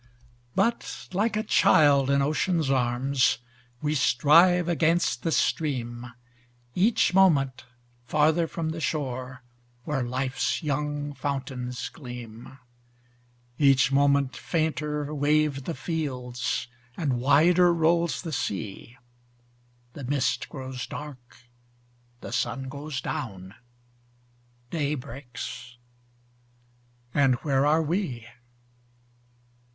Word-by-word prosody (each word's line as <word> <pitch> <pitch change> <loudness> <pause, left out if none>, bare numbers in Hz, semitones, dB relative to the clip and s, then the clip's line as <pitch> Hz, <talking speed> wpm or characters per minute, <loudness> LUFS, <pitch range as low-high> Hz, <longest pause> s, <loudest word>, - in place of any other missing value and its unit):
But, 235 0 -1
like 210 +3 +1
a 215 - 0
child 140 -8 +4
in 140 0 +3
ocean's 155 0 0
arms, 125 0 +2 0.5
We 150 0 +1
strive 165 +6 +4
against 170 -5 +1
the 165 - -1
stream, 125 -8 -1 0.6
Each 200 - +2
moment 140 -9 +3 0.4
farther 155 +4 +2
from 160 0 -3
the 160 0 -5
shore 130 -4 -3 0.4
Where 140 -1 -2
life's 130 +5 -1
young 145 0 -2
fountains 130 -3 -4
gleam; 125 -1 -10 1.0
Each 140 -1 +4
moment 140 -1 +3
fainter 150 -2 -2
wave 145 -1 +1
the 165 - -3
fields, 125 -9 -3 0.3
And 135 -7 0
wider 170 +6 +5
rolls 170 +1 +1
the 165 -3 -5
sea; 105 +1 -4 1.0
The 145 - -8
mist 140 +1 -1
grows 130 -2 -6
dark, 130 -5 -10 0.8
the - - -7
sun 135 -1 -2
goes 145 0 -5
down, 95 -8 -5 1.2
Day 150 -2 -1
breaks, 125 -1 -8 1.4
and 135 -3 +4
where 140 -1 +2
are 160 +2 +3
we? 150 - -2
140 Hz, 95 wpm, -26 LUFS, 130-155 Hz, 1.4 s, wider